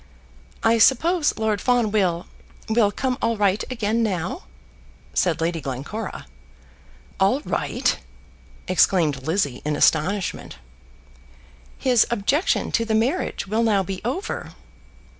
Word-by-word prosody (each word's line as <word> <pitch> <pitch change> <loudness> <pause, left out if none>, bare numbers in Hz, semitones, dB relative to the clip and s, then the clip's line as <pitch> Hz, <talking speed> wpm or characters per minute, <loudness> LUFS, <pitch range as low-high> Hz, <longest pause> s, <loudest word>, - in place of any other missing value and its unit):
"I 225 0 +4
suppose 300 +7 +3
Lord 215 -2 0
Fawn 245 -4 +2
will 180 -5 +1 0.4
will 220 -2 +3
come 255 +2 -2
all 230 -1 0
right 205 0 +2
again 230 -1 0
now?" 190 - -2 0.7
said 165 -3 +1
Lady 165 0 -1
Glencora. 140 - -5 0.9
"All 200 +9 +3
right!" - - -1 0.7
exclaimed 160 -7 +2
Lizzie 160 -7 0
in 150 0 -1
astonishment. 175 +6 +1 1.2
"His 250 -4 +3
objection 235 - 0
to 230 - +1
the 220 -1 0
marriage 250 +11 0
will 215 +4 0
now 210 -4 +2
be 190 0 -5
over." 265 - -4
210 Hz, 115 wpm, -23 LUFS, 180-230 Hz, 1.2 s, I